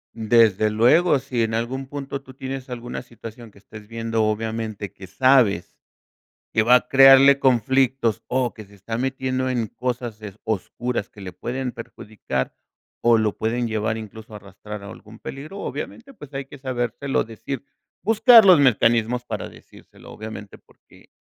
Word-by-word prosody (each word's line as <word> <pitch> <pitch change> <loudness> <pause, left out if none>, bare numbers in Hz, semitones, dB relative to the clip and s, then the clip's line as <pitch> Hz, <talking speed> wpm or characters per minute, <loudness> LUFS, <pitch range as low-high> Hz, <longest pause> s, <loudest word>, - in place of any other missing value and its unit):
Desde 110 -2 +3
luego, 140 +9 +4
si 125 -3 -2
en 110 - -2
algún 120 +4 -2
punto 140 -1 -6
tú 130 - -14
tienes 130 0 -7
alguna 120 0 -6
situación 115 -1 -11
que 100 - -19
estés 105 +1 -13
viendo, 115 -1 -2
obviamente, 110 -1 -3
que 95 - -12
sabes 125 -5 +2 0.8
que 110 - +3
va 125 +2 +6
a 125 0 +3
crearle 135 +1 +7
conflictos 130 -2 +2
o 125 -1 0
que 110 - -11
se 100 +1 -20
está 115 +4 -5
metiendo 130 0 -2
en 120 -4 -1
cosas, 120 -3 -4
eh, 105 -3 -8
oscuras 110 +2 -3
que 105 - -16
le 95 -2 -7
pueden 125 +8 -4
perjudicar 105 - -5 0.5
o 120 -1 +5
lo 110 -2 0
pueden 115 +1 -1
llevar 110 0 -1
incluso 110 0 -10
arrastrar 105 +1 -10
a 100 - -9
algún 110 +1 -13
peligro, 155 +9 -8
obviamente, 275 +4 -7
pues, 145 - -13
hay 135 0 -4
que 140 - -12
sabérselo 130 +1 -2
decir, 115 +4 -7 0.4
buscar 225 +2 +7
los 185 -4 +7
mecanismos 120 -2 +2
para 110 -4 -5
decírselo, - - -16
obviamente, 105 -1 -9
porque - - -23
120 Hz, 160 wpm, -22 LUFS, 110-130 Hz, 0.8 s, crearle